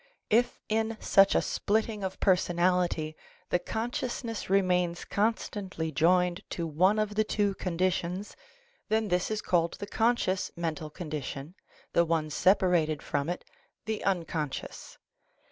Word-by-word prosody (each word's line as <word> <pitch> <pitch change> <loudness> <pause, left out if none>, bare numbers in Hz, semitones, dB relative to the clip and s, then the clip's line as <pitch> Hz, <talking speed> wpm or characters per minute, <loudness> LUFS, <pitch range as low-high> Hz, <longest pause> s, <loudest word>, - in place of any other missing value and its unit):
If 240 +3 +3
in 220 +1 0
such 195 0 +5
a - - +3
splitting 215 0 -1
of 190 0 -4
personality 175 -3 +2 0.4
the 180 - +3
consciousness 230 +2 -3
remains 180 -3 +2
constantly 200 -6 -1
joined 180 +3 +3 0.2
to 170 - -1
one 180 +7 +3
of 215 -1 0
the 215 +1 +2
two 205 -2 0
conditions, 185 +1 -2 0.5
then 220 -1 +1
this 180 0 +1
is 215 -1 -2
called 170 -2 +1
the - - -6
conscious 215 -4 +1
mental 160 -2 -3
condi 155 -1 -5
tion, 140 +5 -6 0.4
the 170 - +5
one 160 -2 0
separated 175 -3 +3
from 140 +3 -1
it, 175 - -4 0.4
the 220 0 -3
unconscious. 165 -6 -3
185 Hz, 130 wpm, -29 LUFS, 170-210 Hz, 0.5 s, such